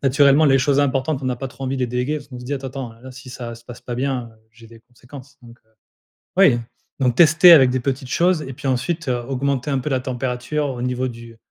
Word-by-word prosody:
naturellement 140 +2 +4
les 135 -2 +4
choses 140 +2 +1
importantes 135 +1 0
on 130 - -1
a 125 - -3
pas 135 +1 -5
trop 130 +2 -9
envie 130 +1 -2
de - - -4
les - - +1
déléguer 125 +5 -2
parce 145 -2 -10
qu'on 125 -3 -9
se 125 - -10
dit: 130 - -5
«Attends, 135 -1 -6 0.2
attends, 115 0 -18
là 130 +1 -11
si 130 0 -12
ça 120 -2 -7
se 115 0 -16
passe 120 0 -11
pas 120 - -6
bien, 125 -1 -2
heu, 110 - -26
j'ai 115 0 -17
des 115 0 -16
conséquences» 130 +4 -15
donc 120 0 -15
heu, 110 - -36 0.7
oui, 165 -12 +5 0.4
donc 125 -3 +1
tester 170 +3 +7
avec 135 -6 +8
des 130 +1 -1
petites 130 0 -3
choses 175 -1 +2
et 135 -2 -7
puis 135 - -6
ensuite 135 +5 -2
augmenter 130 +2 -2
un 135 - +1
peu 130 - -4
la 130 -2 0
température 130 +3 -3
au 125 -2 -6
niveau 125 +1 -1
du 115 -1 -11
130 Hz, 255 wpm, -20 LUFS, 125-140 Hz, 0.7 s, avec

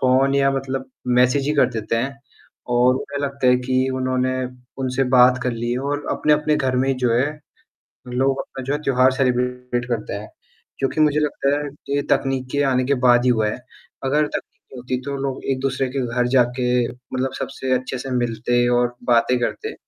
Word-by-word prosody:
Phone 135 +1 +3
या 135 0 +3
मतलब 135 -1 -3 0.2
message 125 +3 +3
ही - - +2
कर 140 - +4
देते 115 0 -2
हैं 135 +3 -2 0.5
और 125 +1 +4
उन्हें 140 +2 -4
लगता 140 -2 -2
है 125 - +6
कि 130 0 +1
उन्होंने 130 0 0 0.5
उनसे 130 +1 0
बात 125 +1 +6
कर 125 - 0
ली 120 +1 -3
है 125 - -1
और 145 +2 -3
अपने-अपने 150 0 +2
घर 130 -2 0
में 135 +1 +1
जो 125 -2 +1
है 145 +5 0 0.7
लोग 135 +2 0
अपना 135 -1 -7
जो 135 +3 -2
है 150 - -1
त्योहार 130 0 +4
सेलिब्रेट 125 -1 -1
करते 115 -3 -2
हैं, 105 +1 -6 0.5
जो 135 - +2
कि 155 - -1
मुझे 150 0 +3
लगता 145 -2 0
है 145 0 -4
कि 140 0 -6
ये 145 - +1
तकनीक 135 -1 +1
के 145 - +1
आने 130 0 +2
के 140 - +2
बाद 120 0 +6
ही 125 - +4
हुआ 110 -3 +2
है। - - -4 0.5
अगर 145 +3 +2
तकनीक - - -7
नहीं 125 - -8
होती 125 +1 -2
तो 140 0 -3
लोग 135 -1 -3
एक-दूसरे 135 0 -1
के 130 -1 -2
घर 125 0 +2
जाके 125 0 +2 0.2
मतलब 130 +1 -4
सबसे 130 -1 -4
अच्छे 130 +1 -5
से 130 +2 -6
मिलते 120 +1 +1
और 120 0 0 0.2
बातें 120 +2 +4
करते, 120 - -3
130 Hz, 200 wpm, -21 LUFS, 125-135 Hz, 0.7 s, है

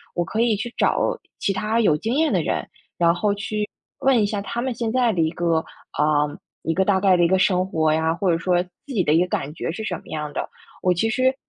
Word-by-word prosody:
我 175 - +1
可 215 +6 -4
以 230 -2 +3
去 230 +4 -5
找 - - +2 0.4
其 - - 0
他 215 +4 0
有 155 -9 +3
经 225 +10 -2
验 315 +1 +2
的 - - +2
人， - - -1 0.3
然 170 -1 +4
后 200 +4 +1
去 210 0 -3 0.3
问 265 -2 +3
一 - - +3
下 205 0 -2
他 235 +4 -4
们 260 0 -1
现 230 -1 -2
在 245 0 +2
的 185 - -3
一 160 - +2
个 170 -1 +1 0.3
啊， 150 0 +2 0.3
一 165 - -1
个 190 +3 +1
大 195 -1 +3
概 190 -2 +5
的 175 - +4
一 - - +4
个 190 +2 +3
生 185 -1 +2
活 160 -4 +1
呀， 160 +1 +1
或 185 +1 +1
者 165 - +2
说 175 +1 +1
自 180 - -22 0.2
己 200 -6 +2
的 150 - +1
一 160 - +5
个 180 - +1
感 150 -4 -3
觉 160 - -4
是 220 - -5
什 190 -4 -2
么 - - -16
样 150 -1 -4
的。 - - -4 0.3
我 180 - +3
其 200 +6 0
实， 260 +3 +2
190 Hz, 280 characters per minute, -23 LUFS, 170-220 Hz, 0.4 s, 概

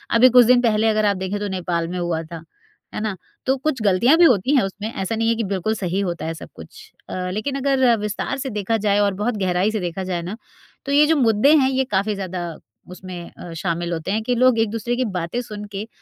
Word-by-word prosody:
अभी 250 +3 +7
कुछ 245 0 +7
दिन 245 +1 +5
पहले 225 -2 +2
अगर 215 -1 +2
आप 200 -2 +2
देखें 190 +2 -3
तो 205 - -3
नेपाल 175 -3 -2
में 180 - -5
हुआ 170 -2 -1
था। 165 0 -9 0.5
है - - -3
ना? 215 -3 -2 0.3
तो 265 - +2
कुछ 265 -3 -2
गलतियाँ 210 - +4
भी 345 - +7
होती 255 - +3
हैं 260 - +4
उसमें 205 +3 -5
ऐसा 195 +3 -3
नहीं 225 0 +1
है 230 - +2
कि 230 - -2
बिल्कुल 195 +2 -1
सही 190 -1 -2
होता 175 -4 -3
है 165 - -2
सब 160 - -10
कुछ। - - -13 0.2
अ, 180 0 -3
लेकिन 240 +7 -3
अगर 265 -3 +3
विस्तार 210 +5 -3
से 265 0 -4
देखा 210 +1 -1
जाए 205 0 +3
और 200 -1 +2
बहुत 235 -1 -1
गहराई 185 +1 +1
से 215 - -2
देखा 180 0 -4
जाए 180 -2 -3
ना 185 +6 -6 0.5
तो 280 - -3
ये 290 +1 +6
जो 320 - +3
मुद्दे 235 +2 +4
हैं, 265 -3 +4
ये 265 0 +1
काफ़ी 205 +2 +1
ज़्यादा 185 -2 -4 0.5
उसमें 180 -2 -9
अ, 170 - -9
शामिल 170 +1 -2
होते 160 +3 -3
हैं 215 +2 0
कि 245 +2 0
लोग 250 -1 +4
एक-दूसरे 225 +2 -1
की 255 +1 0
बातें 170 +9 -3
सुनके 210 -2 -7
210 Hz, 240 wpm, -21 LUFS, 185-240 Hz, 0.5 s, अभी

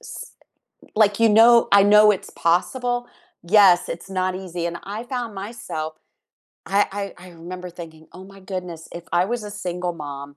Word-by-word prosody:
s - - -10 0.6
like, 210 0 +3
you 225 - +5
know 230 +2 +6
I 200 0 +7
know 210 +1 +6
it's 200 0 -3
possible. 245 +8 0 0.4
Yes, 185 -1 +5
it's 170 +3 -7
not 185 -1 -1
easy- 180 -2 -5
and 170 0 -5
I 210 +3 -6
found 240 -4 -5
myself 190 -7 -6 0.7
I 200 +1 +2
I 200 0 -4 0.2
I 180 +1 -13
remember 180 +2 -9
thinking, 160 -2 -11
"Oh 185 +1 -11
my 195 0 -15
goodness, 180 -4 -7
if 170 0 -8
I 175 +1 +3
was 235 +2 -3
a 210 - -7
single 180 -3 -4
mom, 145 -2 -8
190 Hz, 175 wpm, -22 LUFS, 175-210 Hz, 0.7 s, I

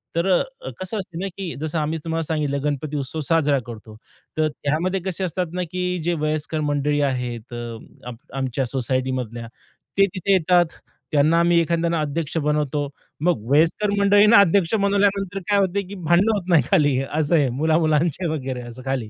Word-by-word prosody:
तर 170 +2 +1
अ, 265 - -5
कसं 185 +3 -2
असतं 180 -3 -7
ना, 195 - -2
की 185 -4 -4
जसं 155 +1 -1
आम्ही 155 +2 -1
तुम्हाला 165 0 -1
सांगितलं, 145 -2 -1
गणपती 150 0 -2
उत्सव 140 +3 -4
साजरा 150 -4 +3
करतो, 110 -2 -10 0.4
तर 155 - +3
त्यामध्ये 160 +7 -1
कसे 190 0 -2
असतात 180 -1 -2
ना, 180 0 -1
की 180 0 -1
जे 175 +1 +1
वयस्कर 155 +1 -1
मंडळी 145 +1 0
आहेत, 120 -2 -5 0.5
आम 125 -1 -6 0.2
आमच्या 130 0 -1
सोसायटीमधल्या, 130 -2 -2 0.5
ते 195 - +6
तिथे 195 +2 +1
येतात. 175 -2 +2 0.3
त्यांना 155 +3 +4
आम्ही 170 0 +4
एखाद्याने 170 0 0
अध्यक्ष 155 +1 -2
बनवतो. 150 -1 0 0.4
मग 175 -11 +2
वयस्कर 165 +8 +3
मंडळींना 205 +2 +6
अध्यक्ष 195 -1 +3
बनवल्यानंतर 200 -1 +1
काय 200 -1 +4
होतं, 195 0 0
की 200 - -8
भांडणं 180 +5 +2
होत 190 -3 -3
नाही 160 -7 +5
खाली, 145 -8 +4
असं 155 +2 +1
आहे 140 -5 +3
मुला-मुलांचं 160 +1 +1
वगैरे 130 -4 -4
असं 120 +2 -10
खाली, 130 -5 -2
160 Hz, 165 wpm, -22 LUFS, 145-180 Hz, 0.5 s, ते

